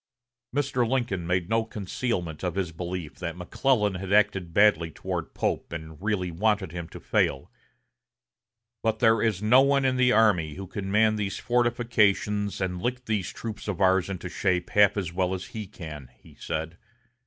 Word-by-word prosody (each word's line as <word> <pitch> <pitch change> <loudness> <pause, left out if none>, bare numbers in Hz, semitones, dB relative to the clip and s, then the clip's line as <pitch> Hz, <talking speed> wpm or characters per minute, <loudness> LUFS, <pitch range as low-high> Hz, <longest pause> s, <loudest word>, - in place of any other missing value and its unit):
Mr. 130 -3 0
Lincoln 115 -10 -1
made 90 -1 0
no 115 +1 +2
concealment 95 -6 -3
of 90 -1 -2
his 95 -4 -1
belief 85 -1 -6
that 85 +1 -4
McClellan 105 +3 +1
had 95 +1 -5
acted 100 -4 +2
badly 85 -4 +4
toward - - -5
Pope - - -2
and 80 -1 -8
really 100 -4 -1
wanted 100 0 0
him 85 -1 -6
to - - -10
fail; - - 0 1.3
"but 110 -1 0
there 110 -1 +4
is 105 -3 0
no 125 +5 +6
one 140 0 +3
in 130 -1 +2
the 125 -1 +4
army 95 -10 +3
who 95 - -6
can 95 +1 -5
man 110 +1 +3
these 100 -2 -2
fortifications 110 -4 +1
and 90 -2 -2
lick 125 +2 -2
these 105 -5 -1
troops 110 -2 -7
of 100 -3 -3
ours 95 -1 +3
into 90 -1 -5
shape 90 -1 -1
half 105 0 +5
as 90 -4 -2
well 95 +1 0
as 90 - -6
he 110 -3 -5
can," 80 -9 -9
he - - -18
said. 80 +2 -5
100 Hz, 175 wpm, -26 LUFS, 90-110 Hz, 1.3 s, no